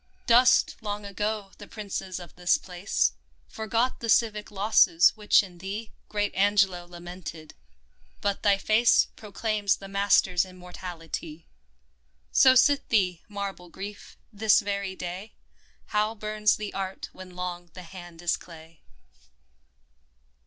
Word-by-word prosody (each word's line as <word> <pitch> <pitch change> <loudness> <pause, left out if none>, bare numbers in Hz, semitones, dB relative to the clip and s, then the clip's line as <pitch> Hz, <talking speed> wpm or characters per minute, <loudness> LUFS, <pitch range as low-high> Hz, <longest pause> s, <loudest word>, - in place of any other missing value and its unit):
Dust, 245 +2 +5
long 205 -1 -4
ago, 205 0 -3
the - - -10
princes 195 -3 -5
of 175 -4 -11
this 180 0 +2
place; 180 - -1 0.3
Forgot 230 +3 -1
the 230 - -5
civic 215 -2 +2
losses 195 -4 +4
which 210 -1 +4
in 180 -3 -12
thee 205 +4 -6 0.2
Great 205 -1 -1
Angelo 195 -3 +2
lamented; 175 -2 -9 0.7
but 200 -1 -1
thy 200 -1 +4
face 220 +4 +4
Proclaims 210 -1 -1
the 195 - -11
master's 195 -2 +3
immortality! 175 -3 -8 0.9
So 260 -1 +6
sit 280 +3 +4
thee, 180 -6 +2
marble 200 -3 -6
Grief! 200 +3 -9 0.2
this 215 +2 +4
very 200 -2 -3
day 185 +4 -7 0.5
How 215 +1 0
burns 215 0 +1
the 210 -1 -6
art 190 -1 -5
when 185 -1 -12
long 175 -1 -5
the 185 - -8
hand 175 -1 -11
is 175 - +1
clay 165 -1 -14
195 Hz, 125 wpm, -27 LUFS, 180-210 Hz, 0.9 s, So